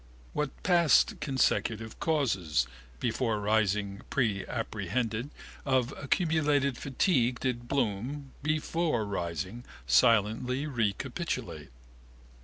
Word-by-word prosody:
What 150 - -3
past 170 -4 +4
consecutive 115 -5 0
causes, 110 - +1 0.3
before 115 - 0
rising 100 -1 +1
preapprehended, 115 +1 -1 0.3
of 130 -2 +1
accumulated 145 -3 +1
fatigue 130 -2 +1
did 120 -2 -2
Bloom, 135 +3 -2
before 155 -4 0
rising, 95 +3 -4 0.2
silently 115 - +3
recapitulate? 115 -9 -2
120 Hz, 75 wpm, -30 LUFS, 105-140 Hz, 0.3 s, past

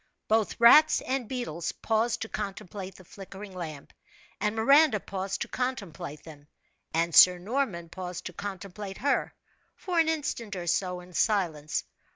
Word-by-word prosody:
Both 220 -1 +1
rats 300 +7 +7
and 260 -3 -2
beetles 175 -11 -3
paused 225 +1 0
to - - -6
contemplate 195 -2 -6
the 185 - -14
flickering 195 +1 -10
lamp, 160 -6 -7 0.5
and 210 +1 0
Miranda 275 +1 +5
paused 195 0 -4
to - - -2
contemplate 200 - -4
them, 150 -3 -13 0.4
and 165 +1 0
Sir 180 +3 +8
Norman 195 -3 -2
paused 180 +1 -7
to 185 - -6
contemplate 195 +1 -7
her, 280 +2 0 0.4
for 360 -3 -1
an 320 -1 +4
instant 240 -9 -3
or 175 -2 -5
so 180 +1 0
in 180 0 -15
silence. 170 -8 0
195 Hz, 150 wpm, -28 LUFS, 180-235 Hz, 0.5 s, Sir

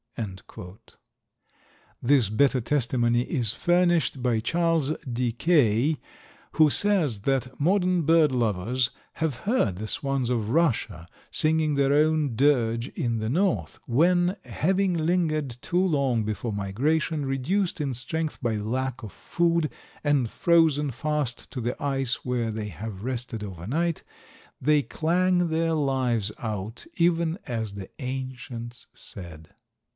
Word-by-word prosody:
This 130 -3 +4
better 130 +4 +3
testimony 120 -2 +1
is 120 -5 -1
furnished 175 -2 +2
by 120 -3 +1
Charles 165 +3 +1 0.2
de 120 0 0
Kay, 140 0 +2 0.6
who 155 -1 +5
says 160 - +2
that 130 +1 -1
modern 180 +2 +2
bird 160 -1 +4
lovers 120 +1 0 0.2
have 160 -7 -2
heard 200 - +1
the 110 +2 -5
swans 135 0 -1
of 115 -4 -1
Russia 115 - 0 0.2
singing 155 -1 +2
their 140 0 +3
own 150 -3 +2
dirge 120 -3 +2
in 115 -2 -2
the 110 0 -2
North, 185 +7 0
when, 175 +8 +3
having 190 +2 0
lingered 155 -5 0
too 180 0 0
long 140 -10 +1
before 110 +2 -3
migration, 140 +10 0
reduced 165 +9 -1
in 140 -3 -1
strength 155 +6 -4
by 120 -3 0
lack 125 +4 -3
of 105 - -7
food, 170 -2 0 0.3
and 145 -6 +2
frozen 160 -3 +3
fast 145 -1 -2
to 130 - -4
the 120 +2 -3
ice 135 -3 -1
where 120 -3 -1
they 110 -1 -4
have 105 -1 -7
rested 125 -3 -4
over 90 -4 -7
night, 165 +5 -1 0.6
they 150 +2 +3
clang 175 +4 +1
their 165 +1 +1
lives 130 -8 0
out, 110 -1 -5
even 170 0 +2
as 110 -4 -3
the 95 -2 -7
ancients 125 -2 -6
said. 85 -4 -10
135 Hz, 130 wpm, -26 LUFS, 115-160 Hz, 0.6 s, who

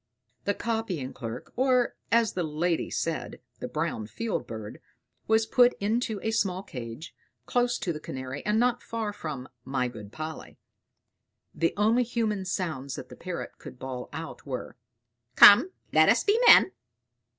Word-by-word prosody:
The 200 - +1
copying 215 - -3
clerk, 115 -1 -7
or, 255 -1 +2 0.2
as 230 -2 +3
the 180 - -1
lady 165 +2 -1
said, - - -3 0.2
the - - -4
brown 110 - -3
field 230 - -3
bird, 110 -2 -8 0.5
was 220 0 +3
put 245 +1 +5
into 220 +1 -1
a 225 - 0
small 195 -4 0
cage, 125 +2 -8 0.3
close 245 0 +1
to 175 - -2
the 150 - -6
Canary, 130 -1 -6
and 210 +2 +1
not 245 0 +2
far 220 -2 -4
from 145 -9 -6 0.2
"my 130 -1 -1
good 105 -4 -9
Polly." 155 +4 -7 1.0
The 165 - 0
only 220 +4 +3
human 220 -5 -1
sounds 160 -8 -3
that 130 - -8
the - - -10
Parrot 180 -1 -6
could - - -10
bawl 125 -1 -6
out 160 0 -7
were, 130 -3 -6 0.6
"Come, 205 - +9 0.2
let - - +6
us - - +4
be 420 +3 +3
men!" - - +8
185 Hz, 155 wpm, -27 LUFS, -, 1.0 s, Come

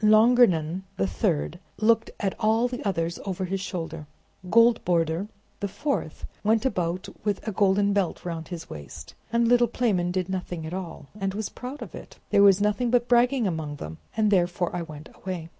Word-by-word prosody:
Longrnan, 215 -7 +5 0.2
the - - +2
third, 175 -4 -1 0.2
looked 225 +1 +3
at 195 -2 0
all 225 +2 +3
the 250 0 -5
others 170 -4 -1
over 190 -1 -3
his 190 +1 -2
shoulder. 165 -5 -5 0.4
Goldborder, 180 -6 +3 0.3
the 200 - -1
fourth, 205 - -3 0.2
went 220 +3 +2
about 180 -7 -1 0.2
with 205 +1 -2
a - - 0
golden 200 0 +3
belt 195 -4 -1
round 165 -2 -4
his 170 -2 -7
waist; 75 -2 -9 0.2
and 235 0 +3
little 240 0 +5
Playman 190 -9 0
did 180 -1 -1
nothing 180 -3 -4
at 160 - -6
all, 180 -5 -6
and 195 -1 -2
was 215 0 -3
proud 255 +2 -7
of 205 - -11
it. - - -10
There 205 -1 +5
was 200 -1 +7
nothing 210 +4 +1
but 240 0 +2
bragging 245 0 +4
among 160 -5 -2
them, 80 - -8 0.2
and 215 -1 +3
therefore 175 -2 +1
I 175 - -2
went 155 -2 -9
away." 180 -4 -6
195 Hz, 180 wpm, -26 LUFS, 170-225 Hz, 0.4 s, was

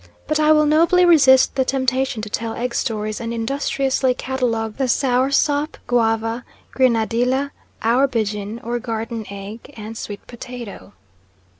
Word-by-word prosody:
But 305 0 0
I 305 0 +4
will 305 -1 +5
nobly 335 +4 +4
resist 270 -6 +6
the 265 - +1
temptation 260 -3 -1
to 210 - -5
tell 225 -1 -3
egg 245 0 -3
stories 215 -3 -2
and 230 0 -4
industriously 265 +2 0
catalogue 230 -5 -2
the 270 -1 0
sour 255 +1 +2
sop, 290 +2 +1
guava, 225 0 0 0.3
grenadilla, 250 +2 +1 0.3
aubergine 225 -3 0
or 240 +1 -2
garden 225 -1 -4
egg, 200 +3 -9
yam, 210 - -7
and 225 +1 -7
sweet 205 -1 -7
potato. 235 - -9
245 Hz, 140 wpm, -20 LUFS, 225-270 Hz, 0.3 s, resist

